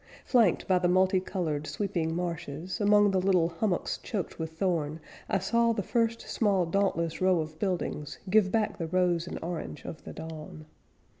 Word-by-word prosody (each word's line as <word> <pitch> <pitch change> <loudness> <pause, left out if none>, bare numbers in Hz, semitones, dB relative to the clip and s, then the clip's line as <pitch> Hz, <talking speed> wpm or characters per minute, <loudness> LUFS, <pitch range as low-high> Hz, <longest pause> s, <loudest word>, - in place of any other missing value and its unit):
Flanked 230 -9 +3
by 185 -1 +4
the 180 - +2
multi 185 +1 +4
colored 160 -6 -3
sweeping 170 -6 -2
marshes, 170 +2 -4
Among 205 0 +5
the 190 -1 +2
little 180 -3 +3
hummocks 175 +2 -1
choked 195 -8 -4
with 160 0 -4
thorn, 165 -5 0 0.3
I 200 - +2
saw 230 +4 +2
the 205 -3 -2
first, 230 +2 0
small, 200 -5 +1
dauntless 170 -2 0
row 185 -2 +4
of 155 0 -5
buildings 175 -6 -2
Give 190 0 +4
back 210 -2 0
the 165 - -2
rose 175 -1 +1
and - - -5
orange 165 -3 -5
of 160 - -7
the - - -8
dawn. 155 -1 -8
180 Hz, 170 wpm, -29 LUFS, 165-200 Hz, 0.3 s, Among